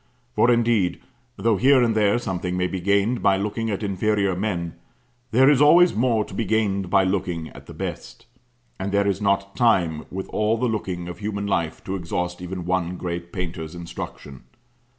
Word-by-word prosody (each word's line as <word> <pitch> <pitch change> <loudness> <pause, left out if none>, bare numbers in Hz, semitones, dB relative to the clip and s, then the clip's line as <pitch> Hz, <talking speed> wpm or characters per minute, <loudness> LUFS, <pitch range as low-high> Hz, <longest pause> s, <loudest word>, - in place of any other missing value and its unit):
For 120 - +4
indeed, 115 -6 +2 0.4
though 115 -3 +2
here 130 +3 +5
and 115 -2 +2
there 105 +1 +3
something 95 -5 -3
may 90 - +1
be 90 0 -3
gained 100 +5 +1
by 95 -1 +3
looking 105 +3 -2
at 105 0 -3
inferior 100 -1 0
men, 90 -4 -2 0.6
there 130 +4 +4
is 145 -1 +5
always 170 +4 +6
more 115 -2 +1
to - - -12
be 105 - -1
gained 100 -3 0
by 95 +1 +4
looking 90 -4 -2
at - - -14
the - - -9
best; - - -6 0.5
and 95 +1 -3
there 100 0 +2
is 100 0 -1
not 100 -1 0
time, 90 -10 +2
with 95 +1 -5
all 110 +2 +1
the 125 - 0
looking 95 -6 -3
of 90 - -8
human 100 -1 -3
life, 85 -5 -2
to 95 - -4
exhaust 90 0 -3
even 90 0 -5
one 90 0 -1
great 85 -1 -5
painter's 85 -3 -5
instruction. 70 -6 -8
100 Hz, 185 wpm, -23 LUFS, 90-110 Hz, 0.6 s, always